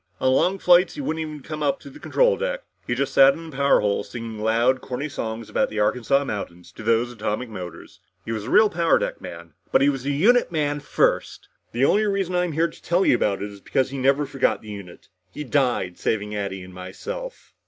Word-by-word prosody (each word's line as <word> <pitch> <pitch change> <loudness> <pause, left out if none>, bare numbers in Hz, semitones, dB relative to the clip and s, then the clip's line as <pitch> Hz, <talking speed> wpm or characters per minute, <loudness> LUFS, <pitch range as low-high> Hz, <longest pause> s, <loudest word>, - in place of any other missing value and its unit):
On 130 0 +3
long 185 +8 +2
flights 180 0 +4
he 295 - -4
wouldn't 160 - -2
even 155 -3 -6
come 155 +1 -6
up 145 -2 +1
to 285 - -11
the 300 - -13
control - - +2
deck. - - -3 0.2
He 120 - 0
just 135 +1 -1
sat 135 0 +7
in 165 -1 -9
the - - -12
power 140 +1 +4
hole 105 -1 0
singing 115 0 -7
loud 115 +4 +2
corny 130 +4 -4
songs 115 -5 -5
about - - 0
the 110 - -4
Arkansas 125 +6 +2
mountains 90 -7 -6
to - - -12
those 115 +2 +1
atomic 115 +1 -3
motors. 90 -5 -9 0.3
He 115 - -4
was 110 -2 -3
a - - -5
real 215 - +6
power 170 -4 +2
deck - - -3
man. 85 -1 -9 0.2
But - - +4
he 140 - +5
was 135 -3 -2
a - - +1
unit 205 - +3
man 145 -2 0
first! 145 - 0 0.2
The 120 +3 +2
only 215 +8 +3
reason 195 -3 -1
I'm 180 -2 0
here 165 +3 +2
to - - -15
tell 175 +3 +1
you - - +5
about 100 -5 0
it 105 - -5
is 100 -1 -13
because 130 +5 0
he 135 - -4
never 135 +3 +2
forgot 135 -4 0
the 110 - -10
unit. 100 -4 -10 0.3
He 150 - -4
died 125 -10 0
saving 105 -1 -1
Addy 95 -2 -4
and 90 0 -12
myself." - - -8
135 Hz, 230 wpm, -23 LUFS, 110-160 Hz, 0.3 s, sat